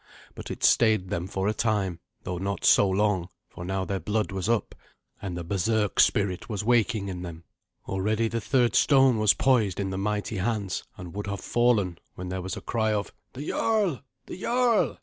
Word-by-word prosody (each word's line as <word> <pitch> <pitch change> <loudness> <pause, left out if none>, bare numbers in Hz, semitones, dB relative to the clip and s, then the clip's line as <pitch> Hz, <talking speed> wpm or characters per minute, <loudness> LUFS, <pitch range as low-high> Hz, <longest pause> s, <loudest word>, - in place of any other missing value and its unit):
But - - -9
it - - -6
stayed 110 -6 +3
them 85 +1 -2
for 95 0 -2
a 105 - +1
time, 100 -7 0 0.2
though 90 -3 -4
not 100 +1 -3
so 100 - +6
long, 95 -2 +1 0.2
for 85 - -10
now 95 +1 -2
their 95 0 -2
blood 105 0 -1
was 95 +2 -3
up, 115 -2 0 0.5
and 95 -4 -4
the 85 - -4
berserk 105 +4 0
spirit 100 -1 +2
was 105 -2 -3
waking 110 -3 +2
in 90 -2 -5
them. 85 -2 -8 0.4
Already 105 +4 0
the 115 +1 -3
third 120 +1 +2
stone 135 -5 +4
was 105 -1 +4
poised 115 -9 +2
in 95 -1 -2
the 95 - -3
mighty 105 +1 -2
hands, 100 -1 -2
and 90 -2 -9
would 105 +1 -5
have 100 0 -4
fallen, 110 -8 +1 0.2
when 90 0 -6
there 95 0 -3
was 95 +1 -5
a - - -7
cry 110 -2 0
of, 105 -1 -3 0.2
"The 140 +4 -7
jarl! 210 - +1 0.2
the 185 - -9
jarl!" 240 -2 +2
105 Hz, 195 wpm, -26 LUFS, 95-115 Hz, 0.5 s, so